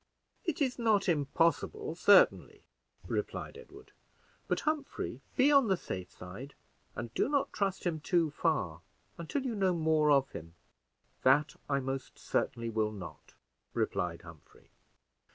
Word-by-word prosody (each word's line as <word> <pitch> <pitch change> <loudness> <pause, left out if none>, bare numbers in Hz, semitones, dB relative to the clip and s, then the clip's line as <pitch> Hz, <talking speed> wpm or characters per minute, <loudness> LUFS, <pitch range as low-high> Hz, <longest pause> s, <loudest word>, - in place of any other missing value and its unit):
"It 315 -4 0
is 255 -2 -2
not 215 -4 +3
impossible, 170 - +1
certainly," - - +4 0.4
replied - - -3
Edward; 465 +1 -14 0.6
"but, - - 0
Humphrey, 305 -2 -2
be 275 +2 +5
on 275 -4 +6
the 190 -2 +2
safe 90 - -6
side, 105 +11 -10 0.4
and 115 -1 -6
do - - +1
not 285 -1 0
trust 195 -2 -1
him 170 -3 -1
too 165 0 +1
far 140 - -1 0.4
until 260 - -3
you 250 - -1
know 190 -4 +1
more 160 -2 +3
of 140 -2 +5
him." 85 +1 -9 0.7
"That 145 +3 +4
I 140 -1 +1
most 135 0 -5
certainly 115 0 -1
will 110 -1 0
not," 85 -8 -10 0.4
replied 85 -1 -1
Humphrey. 85 -3 -16
155 Hz, 135 wpm, -32 LUFS, -, 0.7 s, on